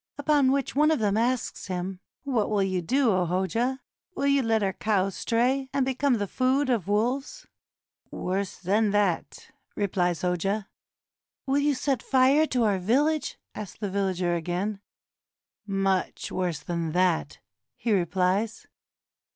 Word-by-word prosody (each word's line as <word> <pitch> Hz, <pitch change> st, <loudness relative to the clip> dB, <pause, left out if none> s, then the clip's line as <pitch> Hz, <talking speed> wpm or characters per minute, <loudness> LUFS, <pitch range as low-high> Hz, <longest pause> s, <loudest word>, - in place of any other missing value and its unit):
Upon 285 Hz, -2 st, +3 dB
which 275 Hz, -2 st, -1 dB
one 300 Hz, +2 st, +4 dB
of 315 Hz, -, +3 dB
them 210 Hz, -3 st, +1 dB
asks 240 Hz, 0 st, -1 dB
him, 185 Hz, 0 st, -4 dB, 0.2 s
"What 250 Hz, -7 st, 0 dB
will 205 Hz, -2 st, +2 dB
you 185 Hz, -2 st, -1 dB
do, 255 Hz, +7 st, +2 dB
O 185 Hz, -2 st, +1 dB
Hoja? 225 Hz, +9 st, -1 dB, 0.3 s
Will 280 Hz, -, -1 dB
you 280 Hz, 0 st, +4 dB
let 225 Hz, -3 st, +1 dB
our 190 Hz, -1 st, 0 dB
cows 195 Hz, -2 st, 0 dB
stray, 260 Hz, +3 st, 0 dB
and 275 Hz, -2 st, +1 dB
become 265 Hz, 0 st, +1 dB
the 205 Hz, -2 st, -1 dB
food 260 Hz, +6 st, +1 dB
of 220 Hz, -7 st, 0 dB
wolves?" 255 Hz, -, -1 dB, 0.6 s
"Worse 190 Hz, +1 st, -3 dB
than 205 Hz, +4 st, +1 dB
that," 200 Hz, -5 st, -1 dB, 0.2 s
replies 180 Hz, -4 st, 0 dB
the 180 Hz, -, +1 dB
Hoja. 195 Hz, +4 st, -1 dB, 0.8 s
"Will 275 Hz, +1 st, +2 dB
you 290 Hz, 0 st, +2 dB
set 260 Hz, -2 st, -1 dB
fire 270 Hz, +4 st, +4 dB
to 250 Hz, -4 st, +1 dB
our 205 Hz, -3 st, +2 dB
village?" 285 Hz, -, +1 dB, 0.2 s
asks 210 Hz, -3 st, -8 dB
the 205 Hz, -3 st, -4 dB
villager 185 Hz, -3 st, 0 dB
again. 180 Hz, +5 st, -2 dB, 0.9 s
"Much 195 Hz, -1 st, -1 dB
worse 175 Hz, -5 st, -2 dB
than 165 Hz, -2 st, -3 dB
that," 180 Hz, -2 st, +1 dB, 0.4 s
he 235 Hz, -, -2 dB
replies. 190 Hz, +4 st, 0 dB
210 Hz, 150 wpm, -26 LUFS, 185-260 Hz, 0.9 s, one